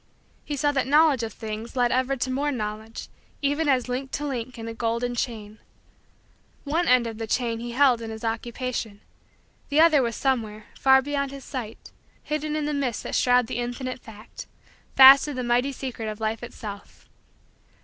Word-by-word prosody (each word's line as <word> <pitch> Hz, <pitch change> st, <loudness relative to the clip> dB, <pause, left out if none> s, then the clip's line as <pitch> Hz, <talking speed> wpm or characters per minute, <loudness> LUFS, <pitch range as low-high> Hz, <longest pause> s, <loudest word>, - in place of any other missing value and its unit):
He 295 Hz, -, -4 dB
saw 290 Hz, +1 st, +1 dB
that 270 Hz, -3 st, -1 dB
knowledge 295 Hz, -2 st, +4 dB
of 225 Hz, -1 st, -4 dB
things 220 Hz, +2 st, -7 dB
led 245 Hz, -1 st, +2 dB
ever 260 Hz, +1 st, +1 dB
to 255 Hz, 0 st, -2 dB
more 285 Hz, +3 st, 0 dB
knowledge, 220 Hz, -2 st, -5 dB, 0.4 s
even 290 Hz, +2 st, +1 dB
as 255 Hz, -2 st, +2 dB
link 255 Hz, +2 st, -3 dB
to 295 Hz, -, -2 dB
link 255 Hz, -3 st, -4 dB
in 225 Hz, 0 st, -7 dB
a 230 Hz, -, -5 dB
golden 235 Hz, +1 st, -2 dB
chain. 220 Hz, -3 st, -4 dB, 1.0 s
One 325 Hz, +4 st, 0 dB
end 250 Hz, -1 st, +4 dB
of 225 Hz, -1 st, -6 dB
the 225 Hz, -, -4 dB
chain 230 Hz, 0 st, -1 dB
he 240 Hz, 0 st, -6 dB
held 255 Hz, -3 st, +4 dB
in 225 Hz, -, -6 dB
his 220 Hz, 0 st, -8 dB
Occupation; 230 Hz, -1 st, -4 dB, 0.7 s
the 290 Hz, -, +2 dB
other 315 Hz, -3 st, +6 dB
was 235 Hz, -3 st, -1 dB
somewhere, 220 Hz, -6 st, -1 dB
far 265 Hz, -1 st, +5 dB
beyond 280 Hz, 0 st, -2 dB
his 275 Hz, 0 st, -10 dB
sight, 240 Hz, -5 st, -7 dB, 0.3 s
hidden 305 Hz, 0 st, -3 dB
in 305 Hz, -1 st, -1 dB
the 300 Hz, -, -1 dB
mists 265 Hz, -6 st, -2 dB
that -, -, -6 dB
shroud 250 Hz, -1 st, +3 dB
the 225 Hz, -, -4 dB
Infinite 245 Hz, +2 st, -4 dB
Fact, 220 Hz, -2 st, -12 dB, 0.5 s
fast 270 Hz, +1 st, +9 dB
to 295 Hz, -2 st, -5 dB
the 255 Hz, -, -3 dB
mighty 245 Hz, +3 st, +1 dB
secret 245 Hz, -4 st, -5 dB
of 215 Hz, 0 st, -7 dB
Life 220 Hz, 0 st, -2 dB
itself. 210 Hz, -4 st, -9 dB
250 Hz, 185 wpm, -25 LUFS, 225-275 Hz, 1.0 s, fast